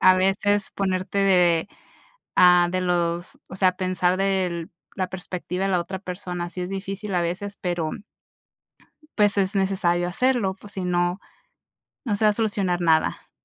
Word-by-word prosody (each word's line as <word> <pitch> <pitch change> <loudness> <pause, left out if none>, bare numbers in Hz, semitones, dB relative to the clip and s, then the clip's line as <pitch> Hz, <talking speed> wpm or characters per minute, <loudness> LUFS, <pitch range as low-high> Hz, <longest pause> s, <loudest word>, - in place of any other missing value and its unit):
a 185 - +7
veces 195 +2 +1
ponerte 190 0 -1
de 180 -3 +3 0.7
a 180 -1 +6
de 185 0 0
los 175 -1 -1
o 190 - -8
sea, 190 -1 +3
pensar 185 -1 0
del 185 -4 0 0.3
la 185 -1 -1
perspectiva 180 0 -4
de 195 - 0
la 180 - +2
otra 190 +2 -4
persona, 180 -2 -5
sí 180 - -5
es 180 - -4
difícil 195 +1 -4
a 175 - +2
veces, 195 +4 -3
pero 175 -3 -1 1.3
pues, 205 -1 +3
es 195 +1 +1
necesario 180 -2 +1
hacerlo, 215 0 +1
pues, 200 +1 -12
si 190 - -4
no, 175 +1 0 0.9
no 210 -5 0
se 215 - 0
va 210 - +6
a - - +1
solucionar 200 -5 0
nada. 160 -2 +1
185 Hz, 160 wpm, -24 LUFS, 175-195 Hz, 1.3 s, a